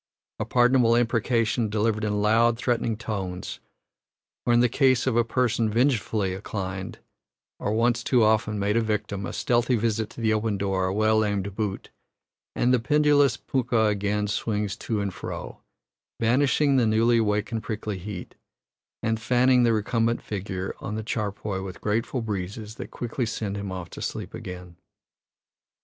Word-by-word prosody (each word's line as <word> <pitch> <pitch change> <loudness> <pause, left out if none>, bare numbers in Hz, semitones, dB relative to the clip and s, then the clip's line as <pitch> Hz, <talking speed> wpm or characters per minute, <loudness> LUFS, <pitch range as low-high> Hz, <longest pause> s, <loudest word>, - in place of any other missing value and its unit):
A - - -1
pardonable 125 -1 +4
imprecation, 115 -1 +1
delivered 110 0 0
in 105 -1 0
loud, 115 +2 +4
threatening 115 -2 0
tones; 95 -5 -5 0.9
or, 120 - +4
in 120 - +5
the 125 - +5
case 130 0 +3
of 130 -3 +1
a 120 - +4
person 115 -1 +1
vengefully 110 -5 +1
inclined, 95 -1 -5 0.6
or - - -1
once 120 +2 +2
too 125 -3 +3
often 110 0 +2
made 100 +1 0
a 115 - +3
victim, 105 -3 -2
a - - -5
stealthy 125 -2 +1
visit 110 -1 0
to - - -12
the 110 -1 +2
open 110 -1 0
door, 95 -1 0
a - - -1
well 110 +1 +3
aimed 100 -2 -2
boot, 105 -3 -3 0.6
and 125 +1 +2
the 125 - +4
pendulous 145 -1 +3
punkah 120 -5 +1
again 105 0 0
swings 105 -1 -1
to 110 -3 -2
and 100 -2 -2
fro, - - -7 0.6
banishing 135 +4 +3
the 120 -3 +3
newly 115 +2 +3
awakened 110 +1 0
prickly 110 -3 -4
heat, 95 -1 -7 0.7
and 110 0 0
fanning 125 +1 +4
the 120 -1 +4
recumbent 115 +2 +1
figure 95 -2 -4
on 105 - -5
the 110 - -3
charpoy 105 -3 -3
with 95 -2 -7
grateful 115 +4 -1
breezes 105 +1 -4
that 125 - -8
quickly 120 0 -3
send 105 -3 -3
him 100 -1 -4
off 90 -2 -6
to - - -8
sleep - - -4
again. 90 -2 -8
110 Hz, 160 wpm, -25 LUFS, 105-120 Hz, 0.9 s, in